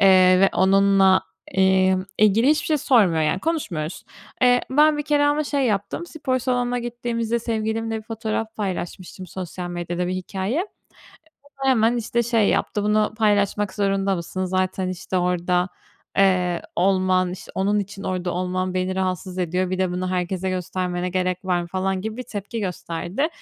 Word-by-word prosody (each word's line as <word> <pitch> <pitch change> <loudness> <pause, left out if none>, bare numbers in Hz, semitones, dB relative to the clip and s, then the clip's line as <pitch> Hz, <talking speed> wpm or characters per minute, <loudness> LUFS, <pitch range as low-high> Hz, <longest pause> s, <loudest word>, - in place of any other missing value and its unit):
eee, 185 -1 +6
ve 195 - +6
onunla, 195 0 +4 0.3
imm, 190 0 +3 0.2
ilgili 215 +5 +4
hiçbir 305 0 +1
şey 310 -2 +2
sormuyor, 200 - +3
yani, 155 +5 0
konuşmuyoruz. 190 - -3 0.4
Eee, 245 0 +5
ben 300 +2 +5
bir - - 0
kere 290 0 +2
ama 295 +1 +2
şey 280 -2 0
yaptım, 210 - -2
spor 265 -6 -2
salonuna 245 -1 0
gittiğimizde 235 -1 -2
sevgilimle 225 0 -2
bir - - -10
fotoğraf 220 0 -4
paylaşmıştım 185 -2 -5
sosyal 180 0 -6
medyada, 175 0 -3
bir 185 - -2
hikâye. 190 - -2 0.8
O - - -20 0.2
da 270 - +4
hemen, 235 -1 +3
işte, 235 +1 0
şey 225 -3 +2
yaptı, 205 - 0
“Bunu 210 0 +2
paylaşmak 205 -2 +1
zorunda 195 -1 +1
mısın? 185 +2 -4
Zaten, 185 0 -1
işte, 185 +1 -3
orada, 180 0 +1 0.5
eee, 180 -3 +3
olman 185 -1 +2
İşte, 185 - -9
onun 200 +2 +1
için 200 0 -6
orda 180 -1 -2
olman 185 +1 -2
beni 185 0 -1
rahatsız 185 0 -2
ediyor. 180 +1 0
Bir 185 - -2
de 185 -1 0
bunu 180 +1 -2
herkese 185 +1 -1
göstermene 180 0 -2
gerek 185 0 -1
var 180 -1 +1
mı?” 170 - -7
falan 190 +1 -1
gibi 220 +2 -5
bir 255 - -4
tepki 210 +2 -6
gösterdi. 180 - -2
190 Hz, 165 wpm, -23 LUFS, 185-225 Hz, 0.8 s, eee